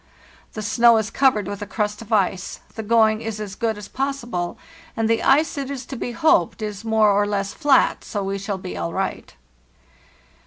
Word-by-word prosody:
The 215 Hz, -, -5 dB
snow 235 Hz, +2 st, +5 dB
is 220 Hz, -1 st, -1 dB
covered 255 Hz, -7 st, +3 dB
with 205 Hz, 0 st, -5 dB
a 205 Hz, -, -5 dB
crust 210 Hz, 0 st, -2 dB
of 230 Hz, 0 st, -12 dB
ice, 190 Hz, -3 st, 0 dB
the 220 Hz, -, -5 dB
going 220 Hz, 0 st, +3 dB
is 225 Hz, -2 st, -5 dB
as 205 Hz, -2 st, -5 dB
good 220 Hz, +1 st, -1 dB
as 210 Hz, -, -8 dB
possible, 245 Hz, -10 st, -3 dB, 0.4 s
and 225 Hz, -1 st, +1 dB
the 225 Hz, 0 st, +2 dB
ice, 290 Hz, +2 st, +3 dB
it 275 Hz, -1 st, -4 dB
is 275 Hz, -2 st, -5 dB
to 270 Hz, -, -7 dB
be 245 Hz, -, -4 dB
hoped, 230 Hz, -, +2 dB
is 210 Hz, -1 st, -5 dB
more 220 Hz, -2 st, +3 dB
or 205 Hz, +1 st, +2 dB
less 200 Hz, -1 st, -2 dB
flat, 290 Hz, -4 st, +3 dB
so 205 Hz, -2 st, -4 dB
we 195 Hz, +1 st, -3 dB
shall 200 Hz, 0 st, -3 dB
be 90 Hz, -, -7 dB
all 85 Hz, -1 st, -3 dB
right. -, -, -4 dB
215 Hz, 200 wpm, -22 LUFS, 200-235 Hz, 0.4 s, snow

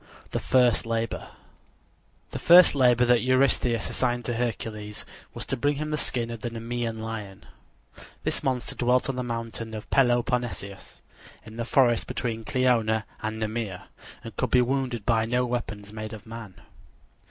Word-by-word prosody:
THE -, -, -1 dB
FIRST 125 Hz, -3 st, +3 dB
LABOR 115 Hz, -, -2 dB, 1.0 s
The -, -, -4 dB
first 175 Hz, +1 st, +8 dB
labor 125 Hz, -3 st, +4 dB
that 120 Hz, -1 st, +4 dB
Eurystheus 130 Hz, -2 st, +2 dB
assigned 120 Hz, -2 st, -1 dB
to 120 Hz, -, -1 dB
Hercules 110 Hz, -3 st, -3 dB, 0.3 s
was -, -, -3 dB
to -, -, -1 dB
bring 145 Hz, +3 st, +1 dB
him 155 Hz, +2 st, -3 dB
the -, -, +1 dB
skin 120 Hz, -4 st, -2 dB
of 115 Hz, -1 st, -7 dB
the 120 Hz, -, -2 dB
Nemean 115 Hz, 0 st, -4 dB
lion. 105 Hz, -4 st, -6 dB, 0.8 s
This -, -, -1 dB
monster 130 Hz, -2 st, -1 dB
dwelt 125 Hz, +2 st, +1 dB
on 135 Hz, -, -1 dB
the 125 Hz, -, -2 dB
mountain 115 Hz, -2 st, -5 dB
of 105 Hz, -, -7 dB
Peloponnesus, 120 Hz, -5 st, 0 dB, 0.4 s
in 110 Hz, +1 st, -11 dB
the 115 Hz, -, -2 dB
forest 120 Hz, -2 st, +3 dB
between 115 Hz, -2 st, -3 dB
Kleona 115 Hz, -4 st, +2 dB, 0.2 s
and 110 Hz, +1 st, -3 dB
Nemea, 110 Hz, -4 st, -4 dB, 0.3 s
and -, -, -9 dB
could -, -, -1 dB
be 125 Hz, -, +5 dB
wounded 125 Hz, -4 st, -2 dB
by 115 Hz, -2 st, +2 dB
no 125 Hz, +2 st, +1 dB
weapons 110 Hz, -4 st, -4 dB
made 110 Hz, 0 st, -6 dB
of 110 Hz, -, -10 dB
man. 115 Hz, -4 st, -9 dB
120 Hz, 160 wpm, -26 LUFS, 110-125 Hz, 1.0 s, first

